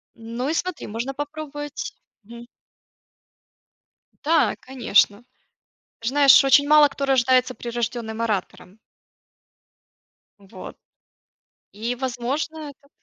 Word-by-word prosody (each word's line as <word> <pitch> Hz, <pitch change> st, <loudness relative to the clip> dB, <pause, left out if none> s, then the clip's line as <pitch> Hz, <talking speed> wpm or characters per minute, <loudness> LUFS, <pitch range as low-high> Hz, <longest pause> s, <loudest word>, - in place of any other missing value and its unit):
Ну 230 Hz, +3 st, -5 dB
и -, -, 0 dB
смотри, 360 Hz, 0 st, -3 dB
можно 235 Hz, +5 st, -4 dB
попробовать 290 Hz, 0 st, -6 dB, 0.3 s
мгм. 235 Hz, +2 st, -12 dB, 1.8 s
Да, 325 Hz, +2 st, +2 dB
конечно. 240 Hz, -4 st, +1 dB, 0.8 s
Знаешь, 275 Hz, +3 st, +6 dB
очень 285 Hz, +1 st, +4 dB
мало 300 Hz, -1 st, +7 dB
кто 280 Hz, 0 st, -4 dB
рождается 255 Hz, -1 st, +2 dB
прирожденным 235 Hz, -1 st, -4 dB
оратором. 205 Hz, -2 st, -4 dB, 1.6 s
Вот. 190 Hz, -2 st, -11 dB, 0.9 s
И 230 Hz, +4 st, -4 dB
возможно 275 Hz, +5 st, -4 dB
это 280 Hz, +1 st, -26 dB
255 Hz, 90 wpm, -23 LUFS, 230-290 Hz, 1.8 s, мало